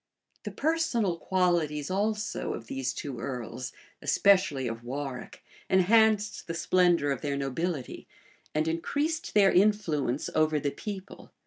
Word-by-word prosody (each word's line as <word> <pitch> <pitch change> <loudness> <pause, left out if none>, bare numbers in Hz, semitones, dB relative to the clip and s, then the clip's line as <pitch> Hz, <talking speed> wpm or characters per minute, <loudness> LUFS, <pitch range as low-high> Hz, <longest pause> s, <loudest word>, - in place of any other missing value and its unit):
The - - -4
personal 270 - 0
qualities 170 -5 0
also 210 +2 -1
of 115 - -9
these 130 +2 -2
two 135 -3 -6
earls, 125 -1 -5 0.3
especially 185 -10 +3
of 115 0 -5
Warwick 135 +1 -6 0.3
enhanced 215 +3 +3
the 165 - -3
splendor 175 -4 +3
of 135 - -2
their 140 -1 -2
nobility, 140 +1 -3 0.5
and 155 +1 +1
increased 290 - -2
then 200 -2 +6
influence 175 - +2
over 155 -1 +2
the 145 0 -1
people. 195 +1 -8
170 Hz, 125 wpm, -28 LUFS, 140-205 Hz, 0.5 s, then